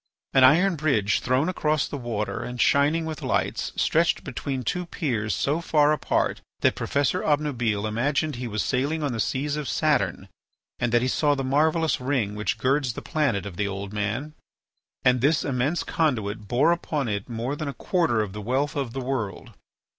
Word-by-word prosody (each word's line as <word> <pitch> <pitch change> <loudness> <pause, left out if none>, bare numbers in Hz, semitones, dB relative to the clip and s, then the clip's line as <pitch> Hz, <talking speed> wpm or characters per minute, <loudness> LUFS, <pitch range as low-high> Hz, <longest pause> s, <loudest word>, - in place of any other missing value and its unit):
An 135 - +6
iron 170 +7 +5
bridge 120 -9 +2
thrown 130 +5 +1
across 155 -4 0
the - - -6
water 120 -5 -3
and 125 0 -6
shining 150 +6 +3
with 160 -2 -5
lights, - - -1
stretched - - +2
between 135 -2 -4
two 180 +9 -2
piers 110 - -1
so 140 - 0
far 150 -3 +3
apart 155 - 0 0.2
that - - +4
Professor 140 -2 0
Obnubile 125 -9 0
imagined 140 +6 0
he 125 0 -4
was 105 -2 -1
sailing 145 +5 0
on 140 -4 -1
the 115 - -4
seas 145 +6 -1
of 150 -2 -4
Saturn 100 - 0 0.5
and 120 -1 0
that 120 +1 +3
he - - +1
saw 145 +2 +2
the 135 - -2
marvellous 155 +2 +2
ring 125 -6 0
which 105 0 -2
girds 135 -1 +1
the - - -7
planet 140 - 0
of 95 -4 -7
the 105 - 0
Old 100 +1 -5
Man. 105 +9 -2 0.7
And 125 -1 +4
this 145 +3 +3
immense 140 +5 0
conduit 110 -9 -1
bore 130 +10 +3
upon 155 -5 -1
it 100 0 -3
more 120 +4 -3
than 150 0 -4
a 140 - -3
quarter 165 - +1
of 100 -3 -4
the 105 - -6
wealth 135 +6 -1
of 135 -5 -2
the 135 - -3
world. 125 -6 -4
130 Hz, 185 wpm, -25 LUFS, 115-150 Hz, 0.7 s, An